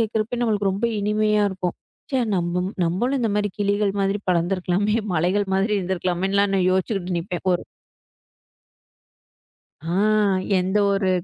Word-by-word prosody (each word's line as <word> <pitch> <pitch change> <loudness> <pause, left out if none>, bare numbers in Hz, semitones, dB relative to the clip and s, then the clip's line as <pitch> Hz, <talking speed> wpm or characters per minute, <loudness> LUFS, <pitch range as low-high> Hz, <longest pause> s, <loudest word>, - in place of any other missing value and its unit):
கேட்கிறப்ப 220 +1 -1
நம்மளுக்கு 205 -4 +1
ரொம்ப 200 +5 -1
இனிமையா 210 0 +2
இருக்கும். 185 -2 -3 0.4
ச்சே! 265 - +1 0.2
நம் 175 -1 0 0.4
நம்மளும் 240 +11 0
இந்த 230 - +1
மாதிரி 205 0 +1
கிளிகள் 205 0 +1
மாதிரி 195 +1 +1
பறந்து 175 +2 +1
இருக்கலாமே, 195 +4 0 0.2
மலைகள் 185 +5 +1
மாதிரி 195 +3 +1
இருந்திருக்கலாமேன்னு 185 +1 -1
எல்லாம் 190 -2 +1
யோசிச்சுக்கிட்டு 185 -1 -1
நிப்பேன். 175 +1 -5
ஒரு - - -2 2.2
ஆ 165 +2 -3 0.6
எந்த 190 +3 0
ஒரு 195 -1 +1
195 Hz, 130 wpm, -23 LUFS, 180-210 Hz, 2.2 s, இனிமையா